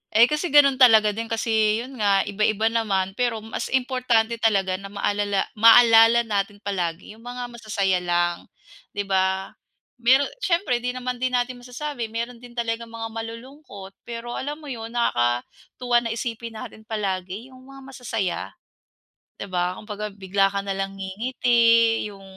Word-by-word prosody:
Eh, 225 Hz, -, +8 dB
kasi 300 Hz, +7 st, +2 dB
gano'n 275 Hz, -3 st, +5 dB
talaga 220 Hz, -4 st, +6 dB
din 225 Hz, +2 st, -5 dB
kasi 220 Hz, 0 st, +1 dB
'yon 260 Hz, -2 st, -11 dB
nga 200 Hz, -2 st, +3 dB
iba-iba 215 Hz, +2 st, 0 dB
naman, 195 Hz, -5 st, 0 dB
pero 225 Hz, 0 st, -2 dB
mas 225 Hz, -, -5 dB
importante 245 Hz, -3 st, +1 dB
talaga 195 Hz, -4 st, +1 dB
na 195 Hz, -, -8 dB
maalala 205 Hz, 0 st, -1 dB
maalala 230 Hz, +1 st, +7 dB
natin 205 Hz, -1 st, -3 dB
palagi 180 Hz, -3 st, -3 dB
'yong 220 Hz, -, -15 dB
mga 245 Hz, 0 st, -6 dB
masasaya 200 Hz, -5 st, -1 dB
lang, 175 Hz, -1 st, -1 dB, 0.5 s
'di 205 Hz, -, -1 dB
ba? 190 Hz, 0 st, 0 dB, 0.5 s
Meron 260 Hz, +4 st, +4 dB
siyempre 340 Hz, -, 0 dB
'di 250 Hz, +1 st, -3 dB
naman 250 Hz, -1 st, -4 dB
din 255 Hz, -1 st, 0 dB
natin 245 Hz, 0 st, -1 dB
masasabi, 250 Hz, 0 st, -5 dB
meron 235 Hz, +2 st, -5 dB
din 245 Hz, 0 st, -14 dB
talagang 230 Hz, 0 st, -3 dB
mga 225 Hz, 0 st, -7 dB
malulungkot. 230 Hz, -2 st, -9 dB, 0.2 s
Pero 235 Hz, 0 st, -6 dB
alam 290 Hz, +4 st, -4 dB
mo 300 Hz, -3 st, -9 dB
'yon, 230 Hz, 0 st, -7 dB
nakakatuwa 235 Hz, -, 0 dB
na 230 Hz, -1 st, -4 dB
isipin 230 Hz, -1 st, -5 dB
natin 220 Hz, 0 st, -10 dB
palagi 200 Hz, +2 st, -4 dB
yung 255 Hz, +1 st, -16 dB
mga 275 Hz, 0 st, -12 dB
masasaya, 225 Hz, -7 st, -3 dB, 0.9 s
'di 200 Hz, -, -8 dB
ba? 180 Hz, 0 st, -1 dB
Kumbaga, 210 Hz, 0 st, -6 dB
bigla 195 Hz, -1 st, 0 dB
ka 200 Hz, 0 st, -3 dB
nalang 195 Hz, 0 st, -3 dB
ngingiti, 230 Hz, +2 st, +2 dB
yung, 195 Hz, -1 st, -12 dB
225 Hz, 155 wpm, -23 LUFS, 200-245 Hz, 0.9 s, Eh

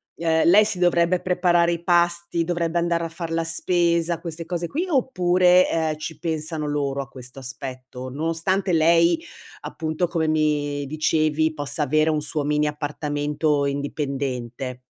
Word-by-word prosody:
ehm, 160 Hz, -1 st, +1 dB
lei 200 Hz, +5 st, +7 dB
si 205 Hz, -3 st, -3 dB
dovrebbe 175 Hz, 0 st, +2 dB
preparare 175 Hz, -1 st, +2 dB
i 170 Hz, -, -5 dB
pasti, 170 Hz, -1 st, +1 dB
dovrebbe 170 Hz, 0 st, -1 dB
andare 170 Hz, 0 st, 0 dB
a 165 Hz, -, -3 dB
far 165 Hz, 0 st, -6 dB
la 165 Hz, 0 st, 0 dB
spesa, 170 Hz, 0 st, +1 dB
queste 165 Hz, -1 st, -6 dB
cose 170 Hz, 0 st, -3 dB
qui, 330 Hz, -, -2 dB
oppure, 185 Hz, -, +3 dB
ehm, 160 Hz, -2 st, 0 dB
ci 155 Hz, 0 st, -6 dB
pensano 155 Hz, -1 st, -3 dB
loro 140 Hz, -1 st, -1 dB
a 135 Hz, -, -9 dB
questo 130 Hz, 0 st, -9 dB
aspetto? 130 Hz, -1 st, -8 dB
Nonostante 165 Hz, +7 st, -1 dB
lei, 170 Hz, -, +4 dB, 0.4 s
appunto, 160 Hz, +2 st, -2 dB
come 165 Hz, -2 st, -1 dB
mi 145 Hz, -2 st, 0 dB
dicevi, 155 Hz, +1 st, +1 dB
possa 145 Hz, 0 st, -2 dB
avere 155 Hz, +3 st, +2 dB
un 155 Hz, -1 st, 0 dB
suo 150 Hz, 0 st, -3 dB
mini 150 Hz, 0 st, +1 dB
appartamento 145 Hz, 0 st, -1 dB
indipendente. 135 Hz, -3 st, -3 dB
160 Hz, 150 wpm, -23 LUFS, 145-170 Hz, 0.4 s, lei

